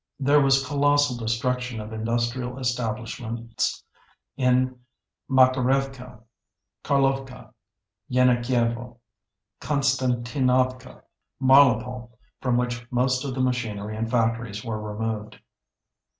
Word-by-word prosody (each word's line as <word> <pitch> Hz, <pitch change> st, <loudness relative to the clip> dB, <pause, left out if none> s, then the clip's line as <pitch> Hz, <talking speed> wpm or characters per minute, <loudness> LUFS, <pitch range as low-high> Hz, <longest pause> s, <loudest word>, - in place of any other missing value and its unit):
There 145 Hz, +2 st, +4 dB
was 135 Hz, 0 st, +3 dB
colossal 145 Hz, -1 st, +2 dB
destruction 125 Hz, +1 st, -2 dB
of 105 Hz, +1 st, -7 dB
industrial 120 Hz, +3 st, -2 dB
establishments 115 Hz, -1 st, -3 dB, 0.5 s
in 125 Hz, -1 st, +1 dB, 0.5 s
Makerevka, 130 Hz, -1 st, +1 dB, 0.6 s
Carlovka, 135 Hz, -2 st, -1 dB, 0.6 s
Yenakievo, 120 Hz, -1 st, +1 dB, 0.6 s
Konstantinovka, 130 Hz, -2 st, 0 dB, 0.4 s
Mariupol, 125 Hz, -3 st, +4 dB, 0.3 s
from 125 Hz, -2 st, +1 dB
which 120 Hz, -1 st, -2 dB
most 125 Hz, +1 st, +1 dB
of 135 Hz, -3 st, -4 dB
the 130 Hz, -, -1 dB
machinery 110 Hz, -5 st, -2 dB
and 115 Hz, +1 st, -3 dB
factories 115 Hz, -3 st, -1 dB
were 110 Hz, -2 st, -3 dB
removed. 105 Hz, 0 st, -4 dB
125 Hz, 85 wpm, -25 LUFS, 115-130 Hz, 0.6 s, There